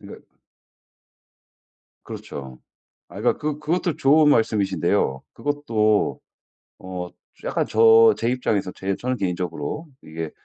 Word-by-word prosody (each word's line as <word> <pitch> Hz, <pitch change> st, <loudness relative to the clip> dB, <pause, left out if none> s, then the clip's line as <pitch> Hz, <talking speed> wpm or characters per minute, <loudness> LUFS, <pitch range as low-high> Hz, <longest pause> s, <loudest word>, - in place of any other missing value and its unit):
그니까 -, -, -12 dB, 1.8 s
그렇죠. 65 Hz, -3 st, -8 dB, 0.5 s
아 95 Hz, +4 st, -9 dB
그니까 120 Hz, -, +1 dB
그 150 Hz, -1 st, -3 dB
그것도 165 Hz, +1 st, -1 dB
좋은 150 Hz, +2 st, +5 dB
말씀이신데요. 100 Hz, -, +1 dB
그것도 115 Hz, -8 st, 0 dB, 0.6 s
어 90 Hz, -1 st, -6 dB, 0.3 s
약간 -, -, -1 dB
저 115 Hz, 0 st, +6 dB
제 115 Hz, -, 0 dB
입장에서 105 Hz, -7 st, -1 dB
제 95 Hz, 0 st, -2 dB
저는 125 Hz, 0 st, -3 dB
개인적으로 90 Hz, -, -3 dB, 0.2 s
이게 80 Hz, 0 st, -6 dB
110 Hz, 255 characters per minute, -23 LUFS, 90-135 Hz, 1.8 s, 저